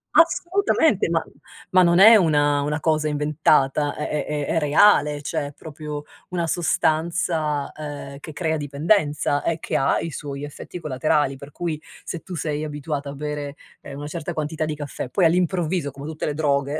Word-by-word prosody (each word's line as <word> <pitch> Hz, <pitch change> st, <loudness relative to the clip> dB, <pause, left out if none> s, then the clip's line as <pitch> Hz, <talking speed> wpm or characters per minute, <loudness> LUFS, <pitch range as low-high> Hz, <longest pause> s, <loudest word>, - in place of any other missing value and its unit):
Assolutamente, 335 Hz, -, +3 dB
ma 165 Hz, -1 st, +1 dB, 0.5 s
ma 185 Hz, -, +6 dB
non 170 Hz, -1 st, +4 dB
è 220 Hz, +5 st, +9 dB
una 145 Hz, -5 st, +3 dB
una 150 Hz, +2 st, -1 dB
cosa 155 Hz, -1 st, +1 dB
inventata, 150 Hz, -1 st, +2 dB
è 150 Hz, -, -3 dB
è 150 Hz, -1 st, -2 dB
è 150 Hz, -1 st, -2 dB
è 165 Hz, -, +1 dB
reale, 150 Hz, -1 st, +4 dB
cioè, 145 Hz, -, -2 dB
è 145 Hz, -, -10 dB
proprio 150 Hz, 0 st, -7 dB, 0.3 s
una 175 Hz, -2 st, -1 dB
sostanza, 160 Hz, -2 st, 0 dB
ehm, 145 Hz, -2 st, -7 dB
che 155 Hz, -, -9 dB
crea 160 Hz, +1 st, -1 dB
dipendenza 145 Hz, 0 st, +1 dB
e 165 Hz, -, -1 dB
che -, -, -4 dB
ha 135 Hz, -, +2 dB
i 165 Hz, -, -4 dB
suoi 140 Hz, -1 st, -6 dB
effetti 145 Hz, +4 st, -8 dB
collaterali. 145 Hz, -1 st, 0 dB
Per 140 Hz, +2 st, -11 dB
cui, 160 Hz, -2 st, -4 dB, 0.2 s
se 175 Hz, -, -5 dB
tu 185 Hz, -, -8 dB
sei 150 Hz, -1 st, -2 dB
abituata 150 Hz, -1 st, -4 dB
a -, -, -6 dB
bere, 145 Hz, 0 st, -5 dB, 0.3 s
ehm, 140 Hz, -1 st, -9 dB
una 145 Hz, -, -6 dB
certa 170 Hz, +2 st, -5 dB
quantità 155 Hz, 0 st, -2 dB
di 155 Hz, -1 st, -3 dB
caffè, 145 Hz, -3 st, -6 dB
poi 180 Hz, +7 st, +2 dB
all'improvviso 175 Hz, -2 st, +1 dB
come 140 Hz, +1 st, -10 dB
tutte 155 Hz, 0 st, -4 dB
le 150 Hz, -, -2 dB
droghe, 145 Hz, -1 st, 0 dB
150 Hz, 180 wpm, -23 LUFS, 145-165 Hz, 0.5 s, è